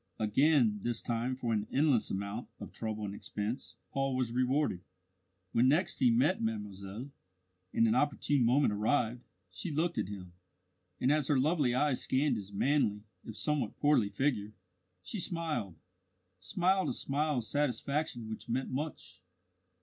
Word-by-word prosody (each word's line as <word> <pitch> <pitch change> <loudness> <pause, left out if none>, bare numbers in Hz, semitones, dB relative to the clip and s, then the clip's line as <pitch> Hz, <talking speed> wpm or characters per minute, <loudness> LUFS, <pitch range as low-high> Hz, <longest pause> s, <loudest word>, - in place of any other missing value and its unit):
Again 115 0 +3
this 120 +1 -1
time 120 +2 -1
for 120 -3 -1
an 105 -1 -1
endless 140 -5 +3
amount 100 +4 -4
of - - -8
trouble 110 -2 -4
and 100 - -4
expense 105 +5 -4 0.2
Paul 135 -1 0
was 130 -3 0
rewarded. 130 -5 +1 0.7
When 120 +2 +4
next 175 +7 +2
he 130 -3 +5
met 130 +11 +3
mademoiselle, 105 +2 -4 0.6
and 115 - +3
an 110 - +3
opportune 145 0 +2
moment 125 0 +3
arrived, 115 +2 +1 0.3
she 180 - -4
looked 165 +3 0
at - - -1
him, 95 -3 -8 0.7
and 130 - +3
as 150 -2 +2
her 145 -4 +3
lovely 145 -3 +2
eyes 145 -1 +2
scanned 135 0 +2
his 100 -1 -7
manly, 105 -2 +1 0.2
if 110 - -8
somewhat 150 -2 0
portly 145 -8 +3
figure, 105 -2 -1 0.5
she 210 - -4
smiled 160 - -2 0.6
smiled 180 - +1
a - - -1
smile 145 +1 0
of 120 - 0
satisfaction 140 -1 -1
which 110 +1 -7
meant 130 +3 -1
much. 135 - -5
125 Hz, 150 wpm, -32 LUFS, 110-145 Hz, 0.7 s, he